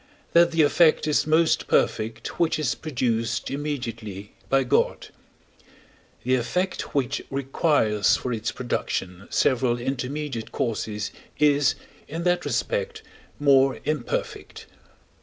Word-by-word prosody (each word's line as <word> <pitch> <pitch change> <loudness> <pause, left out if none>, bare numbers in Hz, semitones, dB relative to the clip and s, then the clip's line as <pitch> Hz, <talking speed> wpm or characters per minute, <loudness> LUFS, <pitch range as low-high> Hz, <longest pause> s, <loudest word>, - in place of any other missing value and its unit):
that 170 0 +6
the 165 -1 +3
effect 155 +2 +4
is 150 0 +1
most 160 +1 +3
perfect 110 +1 0
which 165 -2 +2
is 150 -6 0
produced 115 -6 -2
immediately 115 -9 -5 0.2
by 135 0 +3
God; 125 - 0 1.1
the 130 - +1
effect 165 +12 -1
which 135 -4 0
requires 135 - +2
for 125 - -3
its 115 0 -2
production 95 -6 -3
several 125 -2 +2
intermediate 130 -1 -4
causes 105 -3 -2 0.3
is, 145 -2 +3 0.3
in 165 +3 -5
that 180 0 +1
respect, 475 -3 -2 0.4
more 135 -2 +4
imperfect. 430 - -3
135 Hz, 110 wpm, -25 LUFS, 115-155 Hz, 1.1 s, that